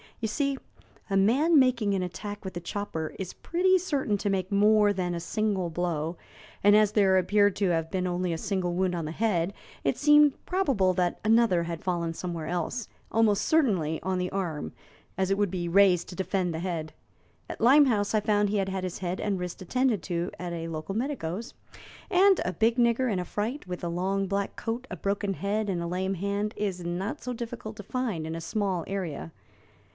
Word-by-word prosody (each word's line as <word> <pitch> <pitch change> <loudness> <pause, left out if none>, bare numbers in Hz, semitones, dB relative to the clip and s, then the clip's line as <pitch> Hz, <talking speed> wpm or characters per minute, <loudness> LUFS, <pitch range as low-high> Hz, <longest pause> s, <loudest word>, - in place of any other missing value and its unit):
You 225 - -1
see, 275 +4 -1 0.5
a 195 - +2
man 280 - +4
making 240 -6 +2
an 190 -2 0
attack 205 +4 -6
with 190 -1 -6
a - - -2
chopper 170 -3 -4
is 190 -2 -5
pretty 370 +2 +2
certain 280 - -1
to 205 - -1
make 185 -1 -1
more 210 +1 +4
than 180 -2 -2
a 170 - -2
single 195 0 -1
blow, 165 -1 -2 0.5
and 205 +1 +7
as 210 -1 +5
there 195 -3 +4
appeared 205 +2 +3
to 195 -2 +1
have 165 -1 0
been 185 -1 -1
only 180 -1 -1
a - - -2
single 185 -1 -1
wound 185 0 0
on 165 -2 -3
the 155 - -4
head, 185 -2 0 0.3
it - - +1
seemed 295 -1 +5
probable 270 - +2
that 180 -1 0
another 220 -5 +4
had 170 -1 -5
fallen 170 -2 -1
somewhere 170 -2 -5
else 175 +7 -2 0.2
almost 220 -3 +3
certainly 190 - +2
on 185 +1 -1
the 180 0 -1
arm, 165 - -3 0.5
as 190 0 +1
it 195 - +2
would 205 -3 +1
be 175 -2 -2
raised 185 -1 +4
to 180 - -8
defend 190 -1 -1
the 160 - -3
head. 165 -3 -4 0.6
At - - -7
Limehouse 240 -5 +5
I - - +4
found 205 -1 +2
he 210 - 0
had 195 -1 0
had 190 -1 -3
his 185 -2 -4
head 180 -1 -3
and 200 -3 -1
wrist 180 +1 -5
attended 240 +2 +1
to 170 +3 -2
at 180 -1 -4
a 165 -1 -4
local 165 +4 -5
medico's, 230 - -3 0.6
and 385 0 +5
a 180 - -1
big 225 +7 +2
nigger 240 +1 +3
in 190 - 0
a 180 - -3
fright, 215 - -3
with 180 -1 -6
a 170 - -1
long 190 +3 -1
black 200 +1 -2
coat, 235 +3 -4
a - - -5
broken 200 0 -1
head, 205 +3 -1
and 175 -3 -1
a 170 - -3
lame 190 +2 -1
hand, 200 +3 -2
is 190 -4 -2
not 175 +4 -3
so 250 - -3
difficult 230 -2 -6
to 205 - -7
find 215 -8 -2
in 160 +1 -4
a 165 - -5
small 195 -2 -1
area. 180 -6 -4
195 Hz, 205 wpm, -28 LUFS, 175-215 Hz, 0.6 s, and